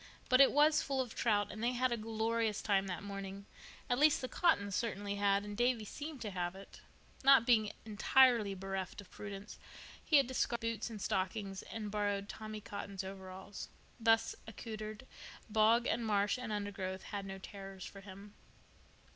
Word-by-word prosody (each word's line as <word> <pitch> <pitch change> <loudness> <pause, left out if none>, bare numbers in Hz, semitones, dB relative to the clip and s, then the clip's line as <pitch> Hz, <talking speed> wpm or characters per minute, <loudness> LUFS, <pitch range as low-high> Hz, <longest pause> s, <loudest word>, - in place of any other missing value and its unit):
But 255 +1 +7
it 275 - +7
was 300 +1 +5
full 275 -1 -2
of 250 -3 -2
trout, 205 -3 +1
and 215 - -6
they 245 +1 +2
had 255 +1 +1
a - - +2
glorious 225 -1 -1
time 195 -2 +2
that 180 +1 -4
morning—at 200 +5 -6
least 300 0 +5
the 255 - -3
Cottons 200 - +2
certainly 205 -3 -2
had, 200 0 +2
and 205 0 -6
Davy 240 -1 +1
seemed 290 +4 -7
to 210 - -4
have 180 -1 -2
it. 195 +1 -12 0.4
Not 270 -3 +7
being 220 -4 +4
entirely 220 -1 +4
bereft 195 0 -4
of 195 -3 -11
prudence, 205 0 -8 0.4
he 310 - +5
had 275 - +5
discarded 240 -2 -1
boots 230 0 -2
and 220 -2 -7
stockings 195 +1 -2
and 215 -2 -6
borrowed 205 -1 -1
Tommy 215 0 -7
Cotton's 200 -1 -6
overalls. 190 +1 -8 0.3
Thus 225 0 +3
accoutered, 215 +1 -7 0.5
bog 225 +2 +4
and 235 - 0
marsh 205 +1 +1
and 240 -3 -5
undergrowth 200 -2 -3
had 200 -1 -5
no 195 0 -6
terrors 195 -1 -9
for 195 - -10
him. 200 +1 -11
210 Hz, 170 wpm, -35 LUFS, 195-235 Hz, 0.5 s, But